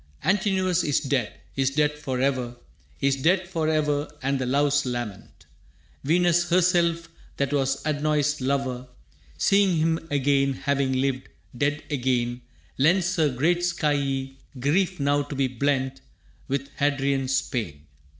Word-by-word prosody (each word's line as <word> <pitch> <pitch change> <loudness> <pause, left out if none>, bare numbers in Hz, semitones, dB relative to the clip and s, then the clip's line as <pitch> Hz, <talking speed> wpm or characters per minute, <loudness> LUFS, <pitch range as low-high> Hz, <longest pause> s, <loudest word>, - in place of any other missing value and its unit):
Antinous 190 -3 +1
is 145 - +2
dead, 135 -6 -1 0.2
is 135 -1 +2
dead 150 +2 +2
forever, 130 -3 -2 0.5
Is 140 0 +2
dead 180 +6 +2
forever 155 -4 0 0.2
and 135 0 0
the 130 - -2
loves 145 +2 +2
lament. 120 -6 -6 0.6
Venus 175 +3 +2
herself, 170 -2 +2 0.3
that 140 0 -1
was 135 -1 0
Adonis' 150 -1 0
lover, 130 -1 -1 0.5
Seeing 195 - +3
him 160 +1 0
again, 140 -1 +2
having 140 0 0
lived, 130 0 -1 0.3
dead 145 +3 -1
again, 125 -3 0 0.4
Lends 175 +5 +3
her 155 -3 +3
great 155 +7 +1
skyey 140 -6 -1 0.2
grief 180 +7 +1
now 145 +1 +2
to 145 0 -6
be 135 -1 +1
blent 135 +1 -1 0.5
With 140 +1 -2
Hadrian's 135 -2 +1
pain. 80 - -5
140 Hz, 125 wpm, -25 LUFS, 135-160 Hz, 0.6 s, Seeing